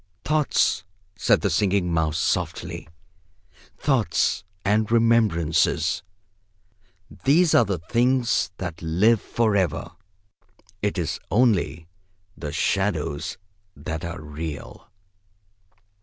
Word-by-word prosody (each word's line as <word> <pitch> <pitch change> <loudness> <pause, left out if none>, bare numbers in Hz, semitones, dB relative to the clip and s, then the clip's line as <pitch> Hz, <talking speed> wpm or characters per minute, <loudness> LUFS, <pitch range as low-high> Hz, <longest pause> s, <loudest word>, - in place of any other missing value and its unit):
"Thoughts," 150 +1 +1 0.3
said - - +2
the - - 0
Singing 95 -4 +1
Mouse 80 -1 +1
softly. - - -2 0.9
"Thoughts 110 - +1 0.2
and 105 +2 +2
remembrances. 110 -9 +2 1.2
These 160 +5 +4
are 120 - +6
the 95 -3 -1
things 120 +8 +1
that 85 -3 -6
live 95 +7 +3
for 110 -3 0
ever. 90 -3 0 0.9
It 105 -1 -1
is 85 -4 -2
only 100 -8 +2 0.5
the 75 -3 -6
shadows 80 -6 -1 0.4
that 80 +3 -5
are 85 -1 -5
real!" 75 0 -7
95 Hz, 95 wpm, -24 LUFS, 80-115 Hz, 1.2 s, are